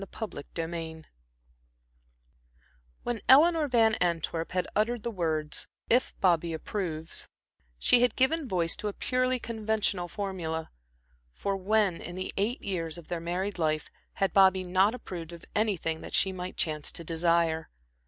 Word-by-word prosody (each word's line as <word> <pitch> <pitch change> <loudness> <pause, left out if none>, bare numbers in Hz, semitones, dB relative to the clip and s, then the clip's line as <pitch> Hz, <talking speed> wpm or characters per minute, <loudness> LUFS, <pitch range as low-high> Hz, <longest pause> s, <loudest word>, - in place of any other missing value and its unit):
Chapter 215 -10 -5 0.2
XV 165 -1 -4 2.0
When 240 -3 -2
Eleanor 310 +3 +7
Van 230 -4 +4
Antwerp 165 -1 0
had 180 -1 0
uttered 220 +1 +1
the 235 - -2
words 160 -6 -2 0.2
"If 245 +2 +2
Bobby 170 -3 +3
approves," 160 -2 -3 0.5
she 240 - +5
had 245 -2 +3
given 285 +3 +2
voice 175 -5 0
to 210 - -3
a 205 - -2
purely 255 +2 +1
conventional 220 -6 -1
formula; 175 -5 -4 0.6
for 200 -1 -2
when, 195 -1 +1
in 175 - -7
the 185 0 -4
eight 215 +6 -1
years 165 -4 -2
of 170 - -12
their 175 -2 -2
married 180 +3 -2
life, 155 -1 0 0.2
had 195 - 0
Bobby 190 -1 +5
not 190 +5 +3
approved 175 -8 -7
of 170 - -11
anything 185 -7 0
that - - -5
she 190 - +3
might 180 0 -6
chance 150 -2 -1
to 170 - -5
desire? 165 -1 +1
185 Hz, 145 wpm, -29 LUFS, 165-220 Hz, 2.0 s, Eleanor